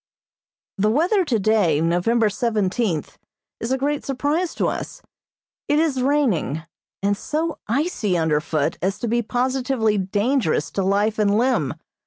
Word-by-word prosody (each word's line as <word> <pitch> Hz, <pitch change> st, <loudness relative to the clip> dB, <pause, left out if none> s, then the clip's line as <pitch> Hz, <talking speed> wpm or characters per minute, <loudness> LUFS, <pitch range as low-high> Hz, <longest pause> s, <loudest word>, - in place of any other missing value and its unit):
The 210 Hz, +2 st, +3 dB
weather 350 Hz, -, +2 dB
today, 215 Hz, -, +2 dB
November 180 Hz, +8 st, +2 dB
seventeenth, 210 Hz, -, -1 dB, 0.4 s
is 230 Hz, -, -3 dB
a 265 Hz, -, +2 dB
great 285 Hz, +2 st, -1 dB
surprise 290 Hz, +6 st, -1 dB
to -, -, 0 dB
us. -, -, -5 dB, 0.6 s
It 295 Hz, -, +2 dB
is 305 Hz, -5 st, +1 dB
raining, 250 Hz, -, +1 dB, 0.4 s
and 200 Hz, 0 st, +2 dB
so 315 Hz, +8 st, -3 dB
icy 235 Hz, -, 0 dB
underfoot 155 Hz, -2 st, 0 dB
as 190 Hz, +3 st, 0 dB
to 235 Hz, -, -3 dB
be 240 Hz, +2 st, +1 dB
positively 250 Hz, -2 st, 0 dB
dangerous 200 Hz, -, 0 dB
to 195 Hz, -, -1 dB
life 205 Hz, +3 st, +1 dB
and 205 Hz, -1 st, +3 dB
limb. 255 Hz, +3 st, +1 dB
225 Hz, 135 wpm, -22 LUFS, 195-270 Hz, 0.6 s, The